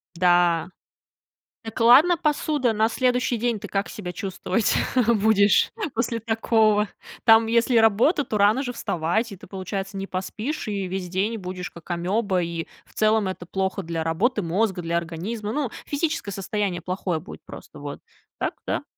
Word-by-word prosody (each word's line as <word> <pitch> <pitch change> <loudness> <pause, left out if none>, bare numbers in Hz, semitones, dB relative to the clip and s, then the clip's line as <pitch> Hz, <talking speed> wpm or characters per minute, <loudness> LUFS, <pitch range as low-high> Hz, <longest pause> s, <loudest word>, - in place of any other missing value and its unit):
Да. 175 -1 +3 1.0
Так, 225 -1 -7
ладно 270 +10 +7
посуда, 295 -5 0
на 220 +1 +3
следующий 250 0 +1
день 235 -1 -1
ты 205 - -7
как 195 +1 -2
себя 180 -4 -6
чувствовать 195 +2 -1 0.3
будешь 210 -3 +4 0.2
после 230 0 -1
такого? 220 -1 +2 0.4
Там 225 -1 +6
если 235 +1 +3
работа, 225 - +4
то 215 - -2
рано 210 +5 +4
же 255 -3 -3
вставать, 210 +2 -1
и - - -7
ты, 185 - -14
получается, 195 +1 -5
не 195 - -3
поспишь, 210 +10 -4
и 200 -2 -2
весь 185 0 -4
день 200 +5 -1
будешь 180 -1 -6
как 170 +1 -14
амеба, 185 +2 0
и 170 -1 -4 0.2
в - - -24
целом, 215 -1 +2
это 185 -2 -6
плохо 190 +1 -2
для 165 -2 -3
работы 200 +8 0
мозга, 185 +2 0
для 165 +1 -2
организма. 195 +6 -4
Ну, 290 -4 -1 0.2
физическое 305 -6 -2
состояние 195 -1 -2
плохое 180 -1 -2
будет 180 - -11
просто, - - -11
вот. - - -7 0.4
Так, - - -2
да. - - -1
205 Hz, 160 wpm, -24 LUFS, 180-230 Hz, 1.0 s, ладно